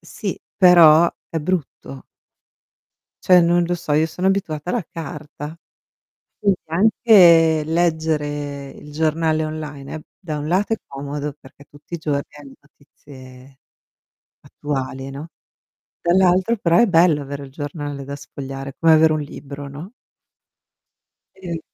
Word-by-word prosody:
sì, - - -6 0.2
però 170 -3 +7 0.2
è 165 - -3
brutto. 150 -5 -4 1.2
Cioè, 180 -1 +7
non 175 +1 +3
lo 175 +1 -1
so 165 -3 -3
io 155 +2 +3
sono 180 +3 -2
abituata 175 -5 -1
alla 230 +1 -1
carta. 150 -1 -8 0.8
Quindi, 200 -3 +1
anche 170 -4 +5
leggere 150 -4 -1
il 150 - -13
giornale 160 +1 0
online 150 -3 -7
è 160 - -6 0.2
da 155 -5 -5
un 145 +1 -5
lato 190 +6 +1
è - - +2
comodo 145 +1 -5
perché 140 0 -17
tutti 145 +3 -21
i - - -3
giorni 145 -3 -1 0.2
hai 140 -2 -13
notizie 135 -2 -17 0.8
attuali, 135 -2 -5
no. 140 +4 -8 0.7
Dall'altro 185 +5 +3
però 170 -4 +2
è 235 - +5
bello 165 -4 +4
avere 140 0 -7
il 135 - -14
giornale 145 0 -6
da 140 +1 -7
sfogliare, 135 -1 -8
come 165 0 +4
avere 160 0 +5
un 155 - -1
libro, 140 -1 -9
no? 155 +9 -10 1.5
Sì. 170 -3 -5
155 Hz, 130 wpm, -20 LUFS, 145-170 Hz, 1.5 s, però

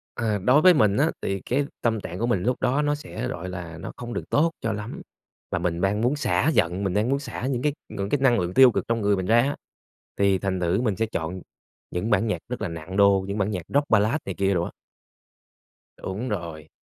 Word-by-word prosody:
À, 110 -3 0
đối 125 +10 +4
với 185 +1 +8
mình 105 -8 +3
á, 150 +4 +3
thì 95 0 -2
cái 145 - 0 0.2
tâm 115 -2 +1
trạng 90 -2 -7
của 115 - 0
mình 100 -7 +1
lúc 125 +4 0
đó 130 +3 +1
nó 145 0 +1
sẽ, 150 - -5
gọi 90 +2 -5
là, 85 -2 -7
nó 85 - -7
không 120 -1 -6
được - - -5
tốt 165 +3 +3
cho 115 - -1
lắm 105 +2 -6 0.5
và - - 0
mình 85 -1 -1
mang 95 +3 +1
muốn 125 +6 +1
xả 145 0 +1
giận, 90 +4 +1
mình 95 -2 -1
đang 105 +3 +1
muốn 135 +1 +2
xả 130 -3 -5
những 130 -2 -1
cái 150 - +2 0.2
ngưỡng 100 -2 -4
cái 145 - +1
năng 130 -3 +4
lượng 90 +1 -3
tiêu 130 -1 +8
cực - - -1
trong 115 0 0
người 100 -1 +2
mình 95 -1 -3
ra 115 +3 +5
á, 140 +4 0 0.6
thì 100 -1 +3
thành 95 -1 -2
thử 90 +4 +1
mình 110 -6 0
sẽ 115 - 0
chọn 90 -3 -4 0.5
những 90 +6 -2
bản 105 +2 +3
nhạc 105 - -1
rất 125 - -4
là - - -1
nặng 85 +3 -7
đô, 100 -1 +5
những 100 +2 -3
bản 100 +1 0
nhạc 90 -4 -3
rock 145 +1 +2
ballad 110 +4 +3
này 95 - -3
kia 100 +1 +1
đồ 85 - +1
á. - - -5 1.3
Đúng 105 +7 -5
rồi. 85 -7 -5
105 Hz, 250 wpm, -25 LUFS, 95-125 Hz, 1.3 s, với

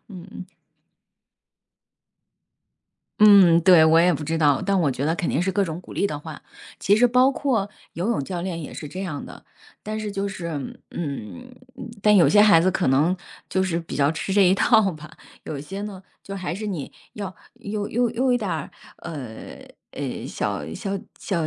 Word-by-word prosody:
嗯- 180 -4 -10
嗯。 185 +1 -10 2.7
嗯， 195 -5 +7
对， 170 -3 +7
我 160 +1 +5
也 180 +1 +4
不 150 0 -4
知 165 +2 -1
道， 145 -4 +3
但 195 0 +1
我 150 - +2
觉 130 +1 -3
得 160 +2 +1
肯 175 - -2
定 150 - 0
是 190 +2 0
各 200 - +1
种 165 -1 -4
鼓 - - -13
励 - - -1
的 150 -7 -1
话， 155 0 -10 0.4
其 205 +2 +3
实 245 +2 +5
包 250 +3 +4
括 230 -8 -1 0.2
游 180 +6 -3
泳 225 -12 0
教 180 +1 -4
练 175 -2 -4
也 150 - -8
是 150 - -7
这 185 +6 -6
样 155 -7 -5
的。 - - -12 0.4
但 215 +1 -4
是 210 -1 -4
就 200 0 -2
是 185 -4 -5 0.4
嗯， 165 - -6 0.5
但 210 +1 +5
有 175 - +6
些 205 - +5
孩 205 -6 +6
子 185 - +2
可 190 - 0
能 150 +8 +3 0.3
就 190 - 0
是 175 -3 -1
比 165 - -7
较 140 +1 +2
吃 175 +4 -4
这 200 0 +5
一 - - +4
套 220 0 +4
吧， 155 -2 -10 0.4
有 145 -3 -5
些 195 +7 -7
呢 200 -3 -7 0.2
就 195 - -7
还 185 -3 -4
是 210 +5 -5
你 175 -9 -4 0.2
要 200 -3 -6 0.3
用 205 0 -4
用 240 0 +1
用 250 +1 +1
一 - - +1
点 205 -5 -3
儿， 160 -4 -3 0.3
呃， 135 -10 -8 0.3
诶， - - -5
小 - - -3
小 195 0 -3 0.2
小 170 -5 -2
185 Hz, 210 characters per minute, -23 LUFS, 160-205 Hz, 2.7 s, 嗯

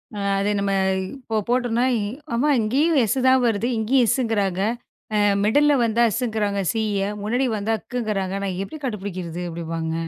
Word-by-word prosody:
ஆ, - - -6 0.2
அத 200 +1 0
நம்ம 200 0 0 0.4
இப்போ 225 -5 -4
போட்டோம்ன்னா, 245 0 +1 0.5
அம்மா! 275 +6 +2
இங்கேயும் 280 +8 +2
எஸ் 225 +5 0
தான் 260 0 +5
வருது. 225 0 +1
இங்கேயும் 240 +3 +3
எஸ்ங்கிறாங்க. 205 -7 0 0.8
மிடில்ல 290 +7 +4
வந்தா 230 +1 +2
எஸ்ங்கிறாங்க. 215 -4 -1
சி 225 -1 -1 0.2
ய! - - 0 0.2
முன்னாடி 245 +6 0
வந்தா 215 +2 -1
அக்குங்கிறாங்க. 210 -6 -3
நான் 185 -2 -3
எப்படி 255 +11 -6
கண்டுபிடிக்கிறது 185 -6 -5
அப்டிபாங்க. 165 -1 -4
220 Hz, 145 wpm, -22 LUFS, 195-245 Hz, 0.8 s, தான்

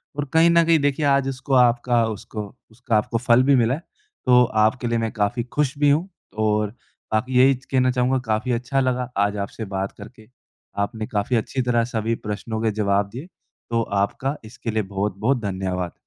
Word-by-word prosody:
और 145 0 -2
कहीं 165 +1 +6
न 170 0 +5
कहीं 165 -1 +4
देखिए 145 +1 0
आज 140 -1 +3
उसको 135 +1 -4
आपका 120 -1 +3
उसको 105 0 -6 0.3
उसका 120 0 -2
आपको 110 +2 -1
फल 120 +1 +4
भी 140 +1 +4
मिला 120 0 +3
है। 155 - -9 0.4
तो 125 0 +6 0.2
आपके 120 +3 +1
लिए 115 0 0
मैं 115 -1 -2
काफ़ी 105 +3 -1
खुश 140 +3 -2
भी 145 0 +3
हूँ 155 +6 +2 0.4
और 105 0 +1 0.4
बाकी 125 +4 0
यही 135 +1 +6
कहना 130 0 0
चाहूँगा 125 +1 +1
काफ़ी 110 +3 -1
अच्छा 125 +3 -1
लगा 125 -1 0 0.2
आज 100 0 -3
आपसे 100 +3 -5
बात 95 +1 -2
करके। 110 +1 -13 0.6
आपने 110 +1 -4
काफ़ी 105 +4 -1
अच्छी 130 +3 -1
तरह 120 -1 +1
सभी 115 -1 -2
प्रश्नों 110 +2 -4
के 110 - +1
जवाब 100 -1 0
दिए, 130 - -8 0.4
तो 115 0 +1 0.2
आपका 125 +7 -2
इसके 115 +1 -6
लिए 110 0 0
बहुत-बहुत 105 +6 -1
धन्यवाद। 95 -3 -3
120 Hz, 185 wpm, -22 LUFS, 110-130 Hz, 0.6 s, कहीं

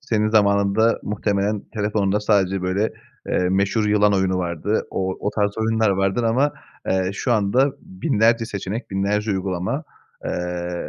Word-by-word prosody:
senin 110 -5 0
zamanında 100 +1 +3
muhtemelen 105 0 -1
telefonunda 105 -1 0
sadece 95 -3 +1
böyle, 95 +4 0 0.4
eee, 90 0 +1
meşhur 100 +3 +1
yılan 105 -1 +3
oyunu 95 -1 +1
vardı. 90 +4 -1
O 95 0 -2
o 105 - -1
tarz 100 0 -1
oyunlar 110 -1 +2
vardır 95 +4 +1
ama, 130 +6 +2 0.4
eee, 95 0 +1
şu 120 +4 -1
anda 120 +6 +2
binlerce 110 +5 +1
seçenek, 105 +2 -5
binlerce 100 +2 0
uygulama, 95 - -2 0.4
eee, 90 0 -3
100 Hz, 140 wpm, -22 LUFS, 95-110 Hz, 0.4 s, zamanında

